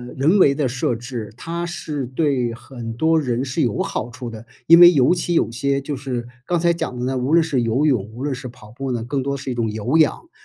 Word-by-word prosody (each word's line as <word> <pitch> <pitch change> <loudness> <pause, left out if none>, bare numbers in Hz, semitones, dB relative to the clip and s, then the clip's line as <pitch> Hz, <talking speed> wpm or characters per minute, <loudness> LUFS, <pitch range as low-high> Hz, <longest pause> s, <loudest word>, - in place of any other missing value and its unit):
人 155 +9 +3
为 140 -7 +5
的 140 -2 0
设 125 -1 -1
置， 115 -3 -7
它 170 +6 -4
是 150 -5 -4
对 130 -3 0
很 115 -1 -8
多 160 +6 +2
人 125 -3 -1
是 130 -2 -2
有 115 -4 0
好 120 +2 -3
处 125 -2 -7
的， 115 0 -10 0.2
因 170 +1 +8
为 175 0 +10
尤 140 +5 +4
其 175 0 -2
有 165 - +2
些 140 +4 -1
就 140 +1 -4
是 125 -3 -4 0.2
刚 175 -1 0
才 170 0 +3
讲 145 -6 -4
的 125 - -2
呢， 130 0 -1
无 130 +4 -1
论 170 -1 +6
是 135 -6 0
游 125 +7 +1
泳， 125 -9 +2
无 120 - -9
论 145 -3 -1
是 130 0 -7
跑 115 -3 -14
步 135 +2 -5
呢， 120 -2 -2
更 130 +2 -2
多 140 0 -2
是 135 -1 -6
一 125 - -2
种 115 -2 -1
有 120 +8 0
氧， 160 - +1
130 Hz, 270 characters per minute, -21 LUFS, 120-150 Hz, 0.2 s, 为